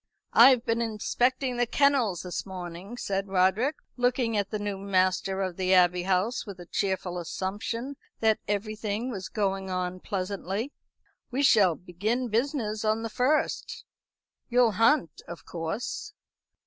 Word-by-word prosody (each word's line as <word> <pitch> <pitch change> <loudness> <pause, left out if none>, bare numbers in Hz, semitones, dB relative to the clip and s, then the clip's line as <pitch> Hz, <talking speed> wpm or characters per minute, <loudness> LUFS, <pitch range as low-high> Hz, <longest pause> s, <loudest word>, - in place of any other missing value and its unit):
"I've 250 0 +7
been 230 +1 +1
inspecting 245 +3 0
the 245 0 +2
kennels 260 - +2
this 180 -1 -4
morning," 185 +3 -8
said 195 -4 -2
Roderick, 195 +9 +2 0.2
looking 245 -2 +1
at 200 -2 0
the 215 - -2
new 205 -2 -3
master 190 0 +1
of 185 -2 -4
the 185 0 +3
Abbey 180 0 +4
House 190 +7 0
with 200 -4 -9
a 175 - -9
cheerful 185 -1 -2
assumption 215 - -4 0.2
that 220 -1 +3
everything 215 +3 -2
was 190 -4 -5
going 195 -2 -1
on 185 0 -2
pleasantly. 200 +6 -3 0.6
"We 265 +3 -1
shall 200 - +5
begin 215 +9 -2
business 225 -2 -1
on 220 +1 +1
the 225 - -4
first. 270 +7 0 0.6
You'll 245 -2 +4
hunt, 225 - +2
of 170 - -9
course?" 180 - -4
205 Hz, 140 wpm, -27 LUFS, 185-240 Hz, 0.6 s, I've